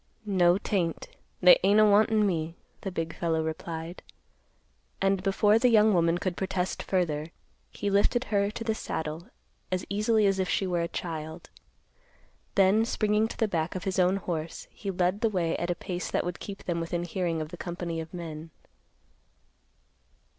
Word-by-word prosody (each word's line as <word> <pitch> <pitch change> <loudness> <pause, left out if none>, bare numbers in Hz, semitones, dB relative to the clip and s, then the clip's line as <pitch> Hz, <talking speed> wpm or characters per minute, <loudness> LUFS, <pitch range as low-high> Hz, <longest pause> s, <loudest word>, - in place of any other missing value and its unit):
"No, 180 -3 +4
'tain't; 185 -5 -2 0.3
they 180 - +8
ain't 200 +2 +5
a 215 - +7
wantin' 215 +1 +4
me," 165 -3 -1 0.3
the 195 - -3
big 165 -2 -4
fellow 160 -1 0
replied. 160 +2 -5 1.0
And 195 -1 +2
before 205 +3 +3
the 250 +1 +4
young 215 -2 +5
woman 170 -1 +3
could 180 0 -2
protest 190 -1 -2
further, 160 -5 -1 0.4
he 205 - -3
lifted 205 +5 +3
her 200 -4 +1
to 215 - -6
the 220 -1 0
saddle 160 -3 -4 0.4
as 185 -1 -1
easily 215 +1 +2
as 195 -1 +2
if 185 -1 0
she 195 - +1
were 175 -2 0
a 170 - -1
child. 160 -2 -6 1.0
Then, 200 +3 +5
springing 215 -1 +1
to - - -9
the 225 - +2
back 165 -3 -2
of 185 - -4
his 190 -1 -1
own 180 +1 +4
horse, 170 -4 -4
he 200 - -6
led 185 +2 0
the 225 - +3
way 175 -5 0
at 175 - -3
a 175 - +1
pace 180 0 -4
that - - 0
would 180 0 -4
keep 200 -1 -8
them 170 -1 -2
within 170 +1 -2
hearing 175 -1 -2
of 155 -1 -4
the 175 - -8
company 170 -2 -4
of 160 +1 -9
men. 165 -2 -7
180 Hz, 175 wpm, -28 LUFS, 170-200 Hz, 1.0 s, they